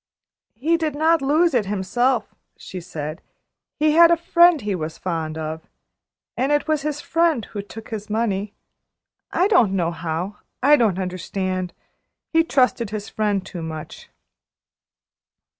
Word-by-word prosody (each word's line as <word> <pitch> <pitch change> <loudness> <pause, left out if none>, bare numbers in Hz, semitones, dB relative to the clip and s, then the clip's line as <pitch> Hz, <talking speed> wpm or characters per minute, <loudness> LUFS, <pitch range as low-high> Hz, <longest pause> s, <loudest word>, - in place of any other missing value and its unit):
"He 315 +9 +1
did 310 -3 -2
not 320 +1 +3
lose 310 +4 +3
it 225 -6 +1
himself," 215 +5 0 0.2
she 185 - -8
said. 155 -1 -6 0.6
"He 305 0 +4
had 335 +2 +7
a 340 - +4
friend 340 0 +5
he 210 -4 -2
was 160 -3 -4
fond 160 -3 -3
of, 160 0 -5 0.7
and 265 +4 0
it 295 +1 +1
was 310 -2 +1
his 295 0 -3
friend, 330 -10 +1
who 205 - -6
took 220 +2 -11
his 215 -1 -6
money. 210 -2 -1 0.8
I 365 - +3
don't 235 - +4
know 170 -3 0
how. 170 +4 -4 0.3
I 290 +2 +7
don't 220 -9 +2
understand. 185 0 -3 0.6
He 325 0 +5
trusted 250 - +1
his 210 -1 -5
friend 205 -3 -1
too 175 - -7
much." 160 -1 -8
215 Hz, 145 wpm, -22 LUFS, 185-295 Hz, 0.8 s, had